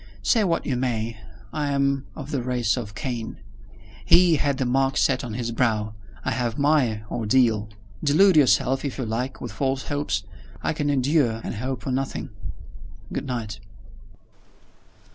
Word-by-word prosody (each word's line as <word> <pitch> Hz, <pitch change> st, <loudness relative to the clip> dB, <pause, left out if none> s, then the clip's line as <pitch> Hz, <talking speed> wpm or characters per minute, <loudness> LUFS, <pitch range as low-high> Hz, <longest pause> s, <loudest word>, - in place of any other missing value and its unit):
Say 220 Hz, -, +4 dB
what 170 Hz, -4 st, 0 dB
you 135 Hz, -, 0 dB
may, 115 Hz, -3 st, -2 dB, 0.3 s
I 150 Hz, -1 st, -1 dB
am 140 Hz, -1 st, +1 dB
of 150 Hz, -1 st, -7 dB
the 140 Hz, -4 st, 0 dB
race 120 Hz, -2 st, +1 dB
of 105 Hz, -5 st, -6 dB
Cain. 120 Hz, -5 st, -4 dB, 0.7 s
He 175 Hz, -2 st, +6 dB
had 145 Hz, -2 st, 0 dB
the 130 Hz, -, 0 dB
mark 135 Hz, +2 st, +1 dB
set 130 Hz, -2 st, +2 dB
on 115 Hz, -3 st, -5 dB
his 120 Hz, -1 st, -2 dB
brow. 110 Hz, -3 st, 0 dB, 0.3 s
I -, -, +1 dB
have 120 Hz, -3 st, -1 dB
my 140 Hz, -7 st, +2 dB
ordeal. 110 Hz, -2 st, +2 dB, 0.3 s
Delude 170 Hz, +6 st, +5 dB
yourself, 135 Hz, -2 st, +4 dB
if 140 Hz, -3 st, -3 dB
you 130 Hz, -, -2 dB
like, 125 Hz, +4 st, -3 dB
with -, -, -5 dB
false 135 Hz, -1 st, -2 dB
hopes. 145 Hz, -9 st, -1 dB, 0.4 s
I -, -, +1 dB
can 145 Hz, -1 st, -1 dB
endure 135 Hz, -4 st, +2 dB
and -, -, -4 dB
hope 130 Hz, +4 st, -4 dB
for 130 Hz, -, -2 dB
nothing. 135 Hz, +1 st, -2 dB, 0.8 s
Good -, -, -3 dB
night." 110 Hz, -4 st, -4 dB
130 Hz, 160 wpm, -24 LUFS, 115-140 Hz, 0.8 s, He